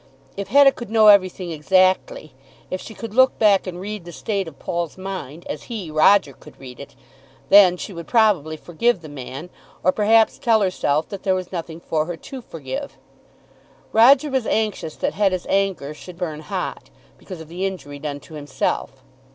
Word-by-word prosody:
If 200 Hz, -1 st, -5 dB
Hetta 275 Hz, +5 st, +6 dB
could 240 Hz, -5 st, -9 dB
know 220 Hz, -1 st, +6 dB
everything 185 Hz, -3 st, +3 dB
exactly, 185 Hz, -, +1 dB, 0.4 s
if 185 Hz, -, -3 dB
she 220 Hz, -, -10 dB
could 225 Hz, -2 st, -8 dB
look 260 Hz, +2 st, +4 dB
back 205 Hz, -3 st, +3 dB
and 180 Hz, -1 st, -6 dB
read 205 Hz, 0 st, -6 dB
the 175 Hz, -, -10 dB
state 195 Hz, +2 st, -3 dB
of 150 Hz, -4 st, -11 dB
Paul's 170 Hz, +2 st, -4 dB
mind 185 Hz, -5 st, -7 dB
as 150 Hz, -, -6 dB
he, 205 Hz, -9 st, -6 dB
Roger, 155 Hz, -1 st, +4 dB
could -, -, -17 dB
read 125 Hz, -2 st, -11 dB
it, 140 Hz, -1 st, -11 dB, 0.5 s
then 190 Hz, -3 st, +7 dB
she 195 Hz, -, -7 dB
would 170 Hz, -1 st, -8 dB
probably 195 Hz, -, +2 dB
forgive 185 Hz, +6 st, 0 dB
the 155 Hz, -, -9 dB
man, 145 Hz, +4 st, -8 dB, 0.3 s
or 185 Hz, -, +4 dB
perhaps 220 Hz, +2 st, +3 dB
tell 225 Hz, -2 st, +3 dB
herself 160 Hz, -5 st, 0 dB
that 200 Hz, -, -7 dB
there 190 Hz, -1 st, +1 dB
was 185 Hz, -1 st, -5 dB
nothing 165 Hz, -2 st, -6 dB
for 155 Hz, -2 st, -1 dB
her 175 Hz, -1 st, -5 dB
to 265 Hz, +9 st, -9 dB
forgive. 140 Hz, -, -7 dB, 1.0 s
Roger 265 Hz, +6 st, +6 dB
was 260 Hz, -4 st, -1 dB
anxious 210 Hz, -8 st, -1 dB
that -, -, -2 dB
Hetta's 190 Hz, -3 st, 0 dB
anger 195 Hz, -7 st, -1 dB
should 175 Hz, +3 st, -12 dB
burn 160 Hz, -4 st, -4 dB
hot, 185 Hz, +3 st, -5 dB, 0.3 s
because 185 Hz, -4 st, -9 dB
of 160 Hz, -, -10 dB
the 175 Hz, +4 st, -6 dB
injury 145 Hz, -7 st, -8 dB
done 145 Hz, -1 st, -5 dB
to 160 Hz, -, -15 dB
himself. 145 Hz, -3 st, -3 dB
185 Hz, 185 wpm, -21 LUFS, 155-210 Hz, 1.0 s, then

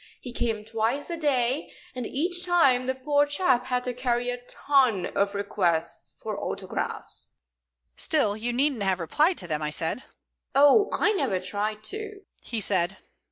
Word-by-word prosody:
He 245 Hz, -, -8 dB
came 225 Hz, -3 st, -2 dB
twice 225 Hz, +8 st, -1 dB
a -, -, -1 dB
day, 270 Hz, -4 st, 0 dB, 0.2 s
and 250 Hz, -3 st, -4 dB
each 350 Hz, +6 st, 0 dB
time 275 Hz, -9 st, +3 dB
the 260 Hz, -, 0 dB
poor 290 Hz, +2 st, +2 dB
chap 270 Hz, -5 st, +1 dB
had 250 Hz, -1 st, 0 dB
to 250 Hz, -, -2 dB
carry 245 Hz, 0 st, 0 dB
a 245 Hz, 0 st, -6 dB
ton 255 Hz, -10 st, +2 dB
of 200 Hz, 0 st, +1 dB
requests 175 Hz, -5 st, -1 dB
for -, -, -3 dB
autographs." -, -, -4 dB, 0.6 s
"Still, 250 Hz, -11 st, +2 dB
you 230 Hz, +3 st, -3 dB
needn't 265 Hz, -1 st, +1 dB
have 190 Hz, -2 st, +1 dB
replied 300 Hz, -, +2 dB
to 175 Hz, -, -4 dB
them," 155 Hz, -2 st, -1 dB
I 150 Hz, -, -1 dB
said. 160 Hz, +9 st, 0 dB, 0.5 s
"Oh, 290 Hz, +10 st, +6 dB
I 425 Hz, -, +3 dB
never 270 Hz, -, 0 dB
tried 205 Hz, +3 st, -3 dB
to," 420 Hz, -, -4 dB, 0.2 s
he 230 Hz, -, -4 dB
said. 190 Hz, -2 st, +1 dB
245 Hz, 160 wpm, -26 LUFS, 205-290 Hz, 0.6 s, Oh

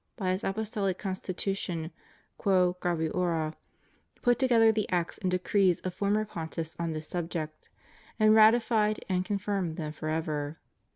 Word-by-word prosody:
by 185 Hz, -5 st, -1 dB
his 185 Hz, +2 st, -2 dB
Apostolic 200 Hz, -2 st, -1 dB
Constitution, 185 Hz, -3 st, -3 dB, 0.5 s
"Qwo 180 Hz, -2 st, +3 dB
graviora," 165 Hz, -2 st, 0 dB, 0.7 s
put 245 Hz, 0 st, +3 dB
together 235 Hz, -4 st, +5 dB
the 215 Hz, -2 st, -1 dB
acts 175 Hz, -2 st, -1 dB
and 185 Hz, -, -1 dB
decrees 180 Hz, 0 st, +2 dB
of 185 Hz, -, -4 dB
former 205 Hz, +3 st, +1 dB
Pontiffs 165 Hz, -4 st, -5 dB
on 165 Hz, -1 st, -1 dB
this 155 Hz, 0 st, -6 dB
subject, 165 Hz, -3 st, -4 dB, 0.5 s
and 215 Hz, 0 st, +6 dB
ratified 220 Hz, -1 st, +4 dB
and 185 Hz, -1 st, +1 dB
con 205 Hz, +1 st, -1 dB
firmed 195 Hz, -5 st, -2 dB
them 155 Hz, -2 st, -4 dB
forever. 155 Hz, -1 st, -3 dB
185 Hz, 135 wpm, -29 LUFS, 165-210 Hz, 0.7 s, and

